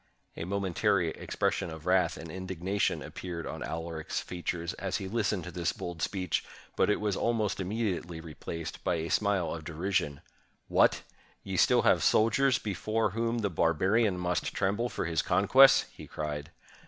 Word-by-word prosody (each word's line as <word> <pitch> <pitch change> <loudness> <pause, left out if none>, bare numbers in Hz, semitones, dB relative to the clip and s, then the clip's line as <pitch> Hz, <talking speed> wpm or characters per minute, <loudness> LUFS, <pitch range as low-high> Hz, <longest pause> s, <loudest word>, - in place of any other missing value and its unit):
A 80 - -5
momentary 95 -1 +1
expression 80 - -2
of 80 0 -9
wrath 90 -1 +2
and 80 -1 -8
indignation 95 +2 -1
appeared 85 -3 -6
on - - -6
Alaric's 80 -1 -4
features 85 0 -4
as 95 +2 -1
he 100 -3 -5
listened 105 -3 0
to 90 - -7
this 85 -2 -1
bold 85 -1 -6
speech, 90 -1 -1 0.3
but - - +2
it 105 - +2
was 105 -2 0
almost 110 -3 0
immediately 95 -4 -2
replaced 80 0 -7
by - - +1
a 80 0 -3
smile 100 -6 +1
of 80 - -6
derision. 80 -3 -1 0.5
"What! - - +3 0.4
ye - - -7
have - - +4
still - - +4
soldiers 125 +4 +3
before 110 +1 -1
whom 115 +2 -1
the 100 - 0
barbarian 95 +6 +2
must 90 -2 -1
tremble 105 +5 0
for - - -3
his 80 -1 +1
conquests!" 135 0 +6
he - - -11
cried. 75 0 -4
90 Hz, 160 wpm, -30 LUFS, 85-105 Hz, 0.5 s, conquests